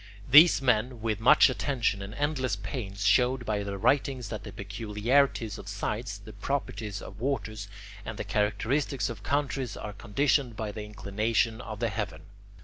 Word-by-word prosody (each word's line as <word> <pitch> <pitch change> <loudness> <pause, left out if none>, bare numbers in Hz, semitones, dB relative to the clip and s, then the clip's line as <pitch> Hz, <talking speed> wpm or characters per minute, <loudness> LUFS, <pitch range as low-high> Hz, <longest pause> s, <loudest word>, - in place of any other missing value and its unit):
These 150 +2 +8
men 125 0 +2
with 110 -2 -1
much 130 +7 +7
attention 125 -6 0
and 100 +2 -7
endless 140 -6 0
pains 100 0 -5
showed 125 +3 +3
by 105 -2 -1
their 100 -1 -4
writings 130 0 +1
that - - -5
the - - -8
peculiarities 115 +1 0
of - - -10
sites, 105 +2 -3
the 105 +1 -12
properties 110 -7 -3
of 95 +2 -10
waters, 110 -5 -3 0.4
and 110 0 -6
the - - -3
characteristics 110 +7 0
of 110 -3 -9
countries 135 -1 -1
are 105 - -6
conditioned 125 +3 +1
by 105 -1 -4
the 105 0 -6
inclination 110 +3 -1
of 110 -3 -7
the 115 -1 0
heaven. 105 -2 -4
110 Hz, 160 wpm, -28 LUFS, 105-130 Hz, 0.4 s, These